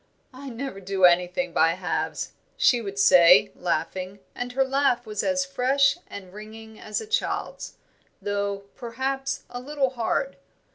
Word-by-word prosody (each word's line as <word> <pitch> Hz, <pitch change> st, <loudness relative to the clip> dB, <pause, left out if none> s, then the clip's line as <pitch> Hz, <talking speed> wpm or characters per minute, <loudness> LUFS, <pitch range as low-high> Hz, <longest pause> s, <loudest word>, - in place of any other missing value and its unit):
"I 270 Hz, +2 st, -9 dB
never 245 Hz, -3 st, -6 dB
do 190 Hz, -1 st, +2 dB
anything 180 Hz, +9 st, +2 dB
by 165 Hz, +1 st, +4 dB
halves," 180 Hz, 0 st, -3 dB, 0.3 s
she 260 Hz, -, +4 dB
would 200 Hz, -2 st, -6 dB
say, 185 Hz, 0 st, +6 dB
laughing, 185 Hz, +2 st, -3 dB, 0.2 s
and 245 Hz, 0 st, -5 dB
her 270 Hz, +1 st, +3 dB
laugh 265 Hz, -3 st, +1 dB
was 210 Hz, -2 st, -3 dB
as 275 Hz, -1 st, 0 dB
fresh 275 Hz, +1 st, +2 dB
and 190 Hz, -2 st, -10 dB
ringing 220 Hz, +1 st, -11 dB
as 215 Hz, -, -3 dB
a -, -, -7 dB
child's, 450 Hz, +3 st, -3 dB, 0.4 s
though, 200 Hz, -1 st, -2 dB
perhaps, 270 Hz, +3 st, -3 dB
a 245 Hz, -, -5 dB
little 270 Hz, 0 st, -1 dB
hard. 260 Hz, +3 st, -2 dB
230 Hz, 145 wpm, -25 LUFS, 195-270 Hz, 0.4 s, say